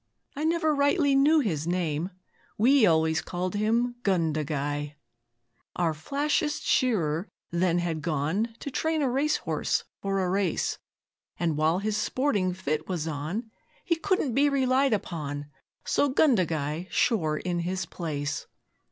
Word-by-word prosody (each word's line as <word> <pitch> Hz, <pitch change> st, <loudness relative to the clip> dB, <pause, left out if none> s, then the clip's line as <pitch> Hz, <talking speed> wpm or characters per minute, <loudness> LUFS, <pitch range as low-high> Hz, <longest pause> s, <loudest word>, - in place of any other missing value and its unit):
I 295 Hz, +2 st, -2 dB
never 320 Hz, -1 st, +2 dB
rightly 285 Hz, +1 st, +3 dB
knew 295 Hz, +3 st, +5 dB
his 165 Hz, -, -2 dB
name 170 Hz, -1 st, -1 dB, 0.5 s
We 245 Hz, +1 st, +5 dB
always 160 Hz, -1 st, +3 dB
call 180 Hz, +1 st, -3 dB
him 225 Hz, +4 st, +1 dB
"Gundagai"!' 150 Hz, -, -1 dB, 0.8 s
Our 170 Hz, -3 st, +1 dB
flashest 290 Hz, -, -1 dB
shearer 185 Hz, -, +1 dB, 0.2 s
then 170 Hz, 0 st, +2 dB
had 170 Hz, -3 st, -1 dB
gone 165 Hz, +10 st, -1 dB
To 280 Hz, -, -5 dB
train 315 Hz, +2 st, 0 dB
a 265 Hz, -, +2 dB
racehorse 290 Hz, +4 st, 0 dB, 0.2 s
for 195 Hz, 0 st, -1 dB
a 185 Hz, -1 st, 0 dB
race, 190 Hz, -3 st, 0 dB, 0.6 s
And 165 Hz, -3 st, 0 dB
while 155 Hz, +3 st, +2 dB
his 210 Hz, +2 st, -1 dB
sporting 215 Hz, -4 st, 0 dB
fit 155 Hz, -4 st, -3 dB
was 170 Hz, -4 st, -2 dB
on 160 Hz, +10 st, -4 dB, 0.3 s
He 335 Hz, -, +2 dB
couldn't 330 Hz, -7 st, 0 dB
be 285 Hz, +4 st, +4 dB
relied 265 Hz, -1 st, +2 dB
upon, 145 Hz, -7 st, -4 dB, 0.3 s
So 285 Hz, -, +2 dB
'Gundagai' 175 Hz, -, +1 dB
shore 160 Hz, -11 st, +1 dB
in 175 Hz, 0 st, -2 dB
his 180 Hz, +1 st, -2 dB
place. 145 Hz, -4 st, -4 dB
185 Hz, 135 wpm, -27 LUFS, 160-260 Hz, 0.8 s, knew